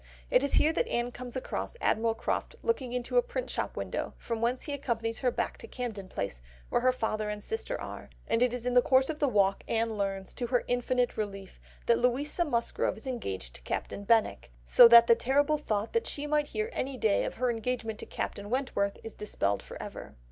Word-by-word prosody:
It - - +5
is 280 - -1
here 315 - +4
that 460 - +1
Anne 240 - -1
comes 245 0 -7
across 260 - -4
Admiral 225 +1 +1
Croft - - -2
looking 270 - 0
into 250 - -1
a - - +8
print - - -4
shop - - -3
window, - - -3
from 230 -1 -4
whence 240 +2 0
he 290 - -4
accompanies 230 -5 -2
her 255 - +2
back - - -3
to - - -8
Camden 220 -6 -5
Place 100 - -4 0.3
where - - +1
her 255 +1 +4
father 215 -3 -2
and 210 0 -3
sister 450 - -4
are, - - -7 0.2
and 230 - +1
in 250 0 +1
the 245 - +7
course 260 +3 +3
of 305 - -8
the 290 - +3
walk 200 -5 +2
Anne 225 -2 0
learns, 195 -1 -2
to 240 - -3
her 245 0 +1
infinite 245 0 0
relief, 195 -3 -5 0.3
that 235 - +4
Louisa 275 +7 +1
Musgrove 235 -7 0
is 220 - -13
engaged 95 - -4
to - - -10
Captain 200 - -4
Benwick, 220 - +2
so 235 - +9
that 235 0 +9
the 235 - +7
terrible 280 +6 +2
thought 215 -5 -2
that 460 - +1
she 290 - -4
might 295 0 +1
hear 435 +2 -3
any 265 0 -3
day 220 -4 +2
of - - -4
her 250 +1 +1
engagement 225 -1 -3
to - - -7
Captain 200 0 -4
Wentworth 235 -6 0
is 225 - -7
dispelled 100 - -1
for - - -10
ever. - - -8
240 Hz, 215 wpm, -30 LUFS, 215-265 Hz, 0.3 s, so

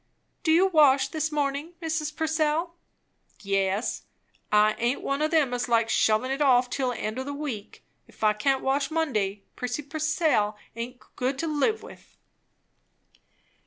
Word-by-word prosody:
"Do 320 - +1
you 345 +4 +5
wash 285 -6 +4
this 310 0 -2
morning, 290 +2 -2
Mrs. 310 -2 -2
Purcell?" 320 +1 0 0.7
"Yes. 195 +2 -1 0.5
I 210 0 +5
aint 240 +3 0
one 275 +1 -1
o' 305 - +3
them 310 -6 +2
as 245 0 -2
likes 230 -1 +2
shovin' 220 +4 +2
it 270 +2 -2
off 250 -3 +4
till 260 -2 0
the 245 - -4
end 215 +4 -3
o' - - -2
the 285 +1 -5
week. 260 -9 -6 0.2
If - - -13
I 215 0 +5
can't 265 +5 0
wash 275 +1 +1
Monday, 210 -12 -1
Prissy 250 +4 -3
Purcell 305 -7 0 0.2
aint 245 +2 -7
good 260 +2 -1
to 330 - -2
live 310 +9 0
with." - - -14
275 Hz, 160 wpm, -26 LUFS, 235-310 Hz, 0.7 s, you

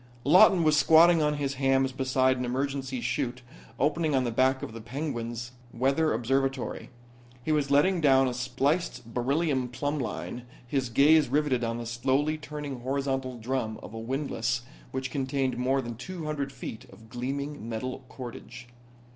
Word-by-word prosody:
Lawton 175 +3 +6
was 155 -1 +4
squatting 165 +2 +6
on 150 0 +2
his 140 -1 -2
hams 135 0 +3
beside 130 0 +2
an 125 - -3
emergency 130 0 -2
'chute 125 +1 -2 0.3
opening 150 +1 +1
on 130 - +2
the 120 - -1
deck 130 +3 +2
of - - -6
the 115 - -8
Penguin's 120 -2 -4 0.2
weather 135 +6 +1
observatory. 135 +3 -1 0.5
He 155 - -1
was 150 -2 +1
letting 165 +6 +3
down 135 -3 +5
a 125 - -1
spliced 130 0 -1
beryllium 135 +1 0
plumb 145 +5 -2
line, 125 -1 -5 0.2
his 130 0 -1
gaze 145 +3 +5
riveted 140 -3 +1
on 115 0 -1
the 120 - -5
slowly 130 +6 0
turning 150 -3 -6
horizontal 135 0 -2
drum 115 -2 -3
of - - -9
a 115 - -5
windlass 120 -1 -2 0.3
which 130 0 -4
contained 135 -1 -1
more 130 +2 +1
than 120 -1 -6
two 165 +7 -7
hundred 145 -3 -3
feet 125 -3 -8
of 110 - -16
gleaming 135 +1 -4
metal 130 +4 -4
cordage. 120 -1 -9
135 Hz, 160 wpm, -28 LUFS, 120-145 Hz, 0.5 s, Lawton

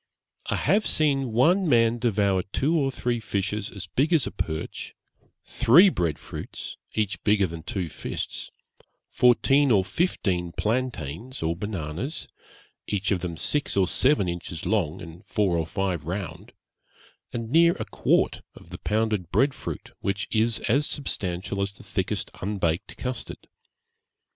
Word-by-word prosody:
I - - 0
have 210 +1 +2
seen 135 -5 +1
one 170 - +4
man 115 -2 +4
devour 100 -5 +2
two 135 - 0
or 140 -4 +2
three 120 -2 -1
fishes 105 -1 -2
as 100 - -7
big 145 +6 0
as 155 -6 +4
a - - -4
perch; 80 -1 -4 0.5
three 140 - +6
bread 85 - -1
fruits, - - -7 0.2
each 105 -2 -1
bigger 105 -1 +4
than 85 -2 -6
two 90 +2 -3
fists; - - -5 0.6
fourteen 135 +3 +4
or 100 -5 +4
fifteen 90 - 0
plantains 115 - -2
or 80 +1 0
bananas, 95 - -4 0.6
each 100 -1 -1
of 95 - +2
them 85 -2 -4
six 145 - 0
or 95 -2 +4
seven 130 -1 +3
inches 85 -1 -5
long, 90 -6 0
and 85 +1 -11
four 100 -4 +1
or 80 -1 0
five 90 -4 -2
round; 95 +1 -5 0.8
and 115 -1 -4
near 170 +2 +6
a - - -5
quart - - +1
of - - -15
the - - -7
pounded 105 -5 0
bread 135 +7 +3
fruit, - - -7
which 100 0 -2
is 115 +1 +3
as 140 +6 +2
substantial 100 -7 -3
as 100 0 -2
the - - -15
thickest 100 +1 -2
unbaked 95 -2 -1
custard. 125 -2 -5
105 Hz, 150 wpm, -26 LUFS, 90-125 Hz, 0.8 s, three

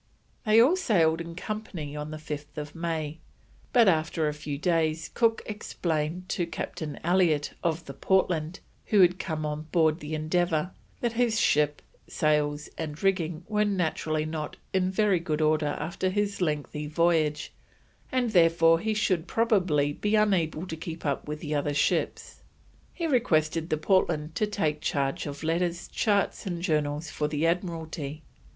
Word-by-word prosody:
They 215 +1 +6
all 265 +10 +6
sailed 170 - +2
in 170 0 -7
company 180 -7 -5
on 150 0 -5
5th 150 -1 -6
May, 160 -2 -3 0.5
but 235 -3 +5
after 160 -2 +2
a 150 - -1
few 150 -1 -5
days 160 -1 0
Cook 230 -1 +2
explained 175 -4 -3
to 175 - -1
Captain 155 -3 -5
Elliott, 170 -4 +2
of 165 0 -1
the 140 - -7
Portland, 175 0 0 0.3
who 210 -3 +5
had 180 0 +5
come 155 -4 -3
on 150 +1 -4
board 160 -2 +3
the 150 0 -4
Endeavour, 160 +2 0 0.3
that 235 -1 0
his 230 -1 +2
ship, 150 0 +2 0.3
sails, 150 -1 +1
and 155 +1 -5
rigging 175 -4 0
were 210 -1 +2
naturally 160 -5 0
not 155 -1 -4 0.2
in 185 -1 +2
very 195 -1 +2
good 155 -2 -2
order 155 -1 +1
after 175 +4 -2
his 205 0 -1
lengthy 150 -2 -2
voyage, 155 -1 +1 0.6
and 250 -3 +1
therefore 165 -3 +5
he 220 +3 -1
should 190 -5 +1
probably 180 - +2
be 210 +7 0
unable 185 -6 +2
to 165 - -5
keep 160 0 -7
up 140 0 -1
with 150 0 -5
the 150 -2 -3
other 145 0 0
ships. 145 - 0 0.5
He 340 - -4
requested 165 - +1
the 155 - +1
Portland 160 -3 +1
to 215 - 0
take 160 -8 -1
charge 140 +1 -1
of 140 +1 -7
letters, 170 +2 -1
charts, 205 -1 0
and 175 -2 -3
journals 150 -2 0
for 150 - -1
the 150 +1 -1
Admiralty. 160 -4 -2
165 Hz, 155 wpm, -27 LUFS, 150-185 Hz, 0.6 s, They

